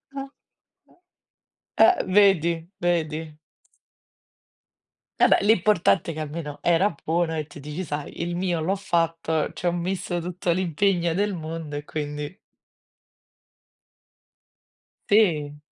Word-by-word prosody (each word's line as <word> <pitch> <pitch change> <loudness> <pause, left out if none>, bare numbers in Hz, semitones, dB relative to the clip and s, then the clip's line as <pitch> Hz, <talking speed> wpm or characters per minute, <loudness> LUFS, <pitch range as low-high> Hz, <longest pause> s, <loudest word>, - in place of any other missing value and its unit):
Ah 275 0 -5 1.5
eh - - +8
eh 370 - +4 0.2
vedi, 195 -5 +5 0.3
vedi. 165 -3 0 2.0
Vabbè, - - +6
l'importante 200 -4 +3
è - - -6
che - - -5
almeno 150 -1 -5
era 175 +4 +3
buono 165 0 0
e 155 - -2
tu 145 - -13
dici: 150 +5 -5
"Sai 150 -2 -5
il 175 0 -2
mio 175 -1 -1
l'ho 175 +5 0
fatto, 165 -4 0
ci 180 - -3
ho - - +3
messo 175 0 -2
tutto 175 +1 -2
l'impegno 175 0 +1
del 200 +2 0
mondo 160 -2 -6
e 145 - -4
quindi". 150 +1 -5 2.7
Sì. 155 -9 +2
170 Hz, 115 wpm, -24 LUFS, 155-185 Hz, 2.7 s, eh